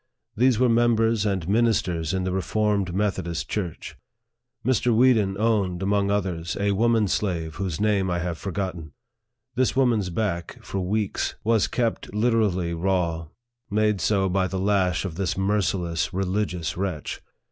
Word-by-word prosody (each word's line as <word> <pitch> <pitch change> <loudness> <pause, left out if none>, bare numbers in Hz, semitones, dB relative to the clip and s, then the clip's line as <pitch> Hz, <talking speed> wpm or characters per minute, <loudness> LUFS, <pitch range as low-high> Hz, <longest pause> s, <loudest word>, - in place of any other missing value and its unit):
These 125 +1 +3
were 125 +2 +3
members 115 -2 +3
and 95 -5 -1
ministers 95 -7 +1
in 95 -1 -1
the 95 - -1
Reformed 100 0 0
Methodist 90 -5 -2
Church. 90 -6 -4 0.7
Mr. 125 -1 +2
Weeden 110 -5 +3
owned, 100 -5 +1
among 100 0 +1
others, 90 -5 -2
a 100 0 +1
woman 110 +1 +2
slave, 85 -6 -2
whose 95 -5 -3
name 105 -3 +1
I 90 - 0
have 85 -1 -3
forgotten. 90 -5 -4 0.6
This 125 0 +1
woman's 120 -8 +2
back, 85 -2 -2
for 100 - -4
weeks, 100 +2 -1
was 115 -1 +2
kept 115 -4 -2
literally 105 -6 +1
raw, 85 -2 -1 0.4
made 105 -2 +1
so 95 +1 +2
by 95 0 +1
the 95 - -4
lash 95 -2 +1
of 85 -4 -5
this 95 -3 -1
merciless, 95 -5 0
religious 95 -3 -2
wretch. 90 -5 -4
95 Hz, 145 wpm, -24 LUFS, 90-110 Hz, 0.7 s, These